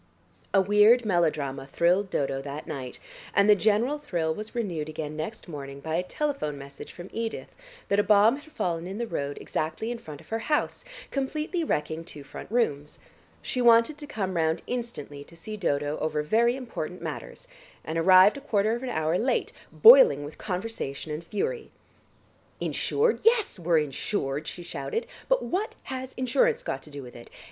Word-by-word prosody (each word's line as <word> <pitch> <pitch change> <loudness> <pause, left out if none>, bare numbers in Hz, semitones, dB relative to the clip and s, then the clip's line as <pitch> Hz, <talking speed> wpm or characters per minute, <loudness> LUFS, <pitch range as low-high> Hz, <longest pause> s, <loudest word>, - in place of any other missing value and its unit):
A 195 - +5
weird 210 +5 +5
melodrama 150 -8 0
thrilled 180 +7 +2
Dodo 135 -3 -1
that 145 +2 -6
night, 130 -3 -6 0.4
and 200 0 +5
the 210 - +8
general 220 +8 +2
thrill 170 - -1
was 215 +6 -8
renewed 175 -10 -2
again 155 -1 -5
next 160 +9 -5
morning 140 -4 -7
by 160 +3 -5
a 170 - +2
telephone 180 - -2
message 140 0 -10
from 175 +1 -10
Edith 225 0 -4 0.4
that 200 - +2
a - - +4
bomb 210 +4 +5
had 305 +2 -15
fallen 170 - -2
in 195 +2 -5
the 235 - -2
road 140 -9 -3
exactly 160 +9 -3
in 240 - -5
front 150 -10 -10
of - - -18
her 225 - -1
house, 300 +6 -1 0.3
completely 305 +5 -2
wrecking 160 - -2
two 150 -3 -10
front 140 - -10
rooms. 150 -11 0 0.5
She 255 - -2
wanted 235 +5 +5
to 295 - -8
come 190 -8 -3
round 160 0 +1
instantly 230 - -5
to 170 - -16
see 215 +6 -7
Dodo 145 -6 -1
over 155 -1 -1
very 235 +9 +3
important 255 -3 -6
matters, - - -7 0.4
and 160 - -4
arrived 185 +6 +7
a - - -8
quarter 215 -5 +1
of 240 - -6
an 260 - -4
hour 160 -2 0
late 250 +2 0 0.2
boiling 480 - +8
with 145 +2 -9
conversation 180 -7 -4
and 155 +2 -4
fury. 450 - -3 0.9
"Insured? 450 +1 +1
Yes, 450 - +3
we're 170 -1 +2
insured," 145 0 -2
she 175 - -6
shouted, 455 - -3 0.2
"but - - +3
what 390 +5 -2
has 260 0 -6
insurance 470 - +2
got - - -3
to - - -13
do 145 -1 -8
with 125 - -12
it? 120 - -12
195 Hz, 180 wpm, -27 LUFS, 155-240 Hz, 0.9 s, the